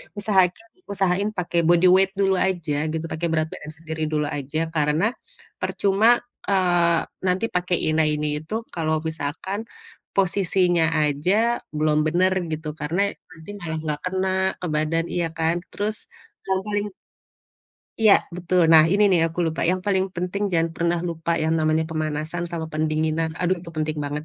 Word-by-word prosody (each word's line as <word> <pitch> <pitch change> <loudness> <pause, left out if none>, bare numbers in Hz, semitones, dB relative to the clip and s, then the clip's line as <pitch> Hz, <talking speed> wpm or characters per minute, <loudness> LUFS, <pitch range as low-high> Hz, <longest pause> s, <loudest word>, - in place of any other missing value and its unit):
Usahakan 200 0 +1 0.2
usahain 195 0 0
pake 175 -2 -2
body 175 +1 +5
weight 190 +1 +4
dulu 195 -1 +2
aja 160 -5 0
gitu, 160 +1 -3
pake 170 +2 -2
berat 160 -1 0
badan 150 - -8
sendiri 160 -1 -4
dulu 150 -1 0
aja, 155 +4 -3
karena, 155 +6 +1 0.5
percuma, 215 +5 +3 0.2
eee, 175 -4 +3 0.2
nanti 185 +3 0
pakai, 180 0 0 0.2
ina 155 0 +2
ini, 150 0 -1
itu 215 +9 -4
kalau 155 -2 -1
misalkan, 160 +7 -4 0.5
posisinya 180 -2 +2 0.2
aja 190 +12 +1 0.2
belum 150 0 +2
benar 180 +4 +2 0.2
gitu, 155 0 -4
karena 180 +7 0 0.2
nanti 160 +2 -13
malah 160 -3 -4
enggak 150 -2 -2
kena 190 0 0 0.3
ke - - -1
badan, 160 +2 0
iya 175 -1 0
kan, 165 +1 +1 0.2
terus, 210 +1 -2 0.5
yang 190 0 +1
paling 205 0 -1 1.1
Iya 215 -2 +7 0.2
betul. 180 0 +1
Nah, 160 -1 +9
ini 205 +1 +3
nih 180 -3 +4
aku 165 +1 -8
lupa, 160 0 -2
yang 185 0 0
paling 190 -2 +2
penting 180 +3 -2
jangan 165 -1 +1
pernah 170 0 +1
lupa 165 0 -4
yang 160 +1 +1
namanya 155 0 +2
pemanasan 155 +1 -3
sama 165 -2 -4
pendinginan, 155 +1 0
aduh 185 +1 +1
itu 170 -1 -10
penting 155 0 -1
banget. 145 +1 -4
170 Hz, 155 wpm, -23 LUFS, 155-190 Hz, 1.1 s, Nah